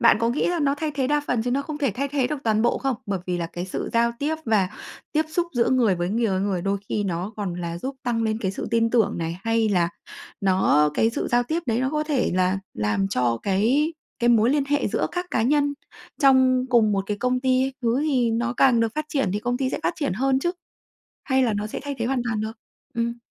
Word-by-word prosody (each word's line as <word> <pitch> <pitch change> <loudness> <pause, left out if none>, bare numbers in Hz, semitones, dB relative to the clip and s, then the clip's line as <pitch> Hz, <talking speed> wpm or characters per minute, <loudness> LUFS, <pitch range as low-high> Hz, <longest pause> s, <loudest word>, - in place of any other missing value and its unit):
bạn - - +6
có 230 - +2
nghĩ 240 +5 0
là 350 -1 0
nó 280 -1 +2
thay 305 +1 -3
thế 270 -2 0
đa 295 +2 +2
phần 240 -2 0
chứ 245 - -2
nó 275 +3 +1
không 300 +1 -6
thể 280 -5 +1
thay 275 +8 -3
thế 275 -2 0
được 300 - -2
toàn 220 -1 +2
bộ 235 - +2
không? 270 -3 -1
Bởi 200 -2 -1
vì 180 -1 -1
là 170 - -2
cái 175 +1 -6
sự 185 - -4
giao 235 0 +2
tiếp 300 +2 0
và 210 -6 +2 0.4
tiếp 310 +1 +2
xúc 340 +2 0
giữa 240 -2 +2
người 240 -7 +3
với 175 0 -2
người, 225 +4 +1
ơ, 190 -3 0
người 195 -3 -1
đôi 200 +1 0
khi 205 - -1
nó 185 +2 -3
còn 200 -4 -3
là 170 -1 -4
giúp 265 +8 -5
tăng 235 -2 0
lên 220 -1 0
cái 190 - 0
sự 195 - -5
tin 230 -1 +2
tưởng 225 -7 +2
này, 165 +1 -3
hay 225 -1 +2
là 175 -4 +2 0.5
nó 185 -6 +3
cái 225 - +3
sự - - -3
giao 240 0 +3
tiếp 320 +7 -2
đấy 230 0 +1
nó 260 +1 0
có 305 0 -1
thể 295 -5 0
là 185 +1 +2 0.2
làm 105 - 0
cho 120 -9 0
cái 235 - +2 0.3
cái 240 - +2
mối 230 0 +5
liên 285 0 +2
hệ 290 +1 0
giữa - - 0
các 355 0 -3
cá 225 - +1
nhân 285 +3 +2 0.5
trong 260 -2 +5
cùng 225 -4 +4
một 195 -1 0
cái 210 - -2
công 250 +3 0
ty 255 0 +2
ấy, 270 - -3
hứa 235 +3 +1
thì 260 -6 +1
nó 235 +2 0
càng 245 -4 +5
được 225 -1 0
phát 305 - -2
triển 275 -10 0
thì 205 - 0
công 245 +2 -1
ty 260 0 -1
sẽ - - -2
phát 165 - +1
triển - - -1
hơn 265 +6 +1
chứ? 345 +6 0 0.7
Hay 265 -2 +2
là 240 -3 +2
nó 205 +1 -2
sẽ 215 - -5
thay 285 0 -4
thế 230 - -1
hoàn 255 -1 0
toàn 225 -3 -1
được? 220 +1 -3 0.4
Ừm. 235 +1 -2
235 Hz, 265 wpm, -24 LUFS, 200-270 Hz, 0.7 s, bạn